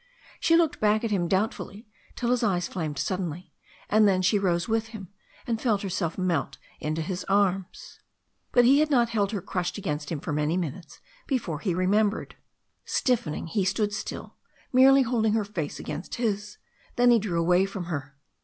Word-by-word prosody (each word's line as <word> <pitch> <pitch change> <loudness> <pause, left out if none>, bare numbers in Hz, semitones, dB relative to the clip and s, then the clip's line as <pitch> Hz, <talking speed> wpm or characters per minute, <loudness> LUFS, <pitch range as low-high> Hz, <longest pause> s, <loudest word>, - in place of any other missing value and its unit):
She 330 - +4
looked 335 -3 +1
back 215 +1 +2
at 230 - -1
him 180 -4 +1
doubtfully 205 +3 -2 0.3
till 240 -1 -1
his 250 - +2
eyes 180 -6 +1
flamed 155 -5 -4
suddenly, 180 -2 -3 0.3
and 215 0 +4
then 185 -2 +2
she 200 +3 +3
rose 175 -3 0
with 225 0 0
him 215 -5 -9 0.4
and 230 -2 -2
felt 215 -5 +1
herself 180 -3 -2
melt 180 -6 -1 0.2
into 155 +1 -2
his 180 +3 -4
arms. 195 -2 -1 0.5
But 245 -1 +5
he 275 +4 +6
had 305 0 +2
not 240 -5 +3
held 205 -3 0
her 200 -6 -3
crushed 180 0 -3
against 150 -6 -4
him 160 - -2
for 150 - -4
many 150 +3 0
minutes 170 0 -6 0.3
before 205 - -2
he 180 0 -1
remembered. 205 +4 +1 0.5
Stiffening, 230 - -1
he 195 +4 -1
stood 205 +2 0
still, 200 - -6 0.4
merely 270 +1 +7
holding 225 -3 +1
her 220 -2 +1
face 170 -8 -4
against 155 +5 -6
his. 210 -4 -2 0.4
Then 245 0 +5
he 235 - +5
drew 190 -5 -2
away 180 +3 +3
from 195 -2 -5
her. 145 -5 -5
195 Hz, 180 wpm, -26 LUFS, 175-225 Hz, 0.5 s, merely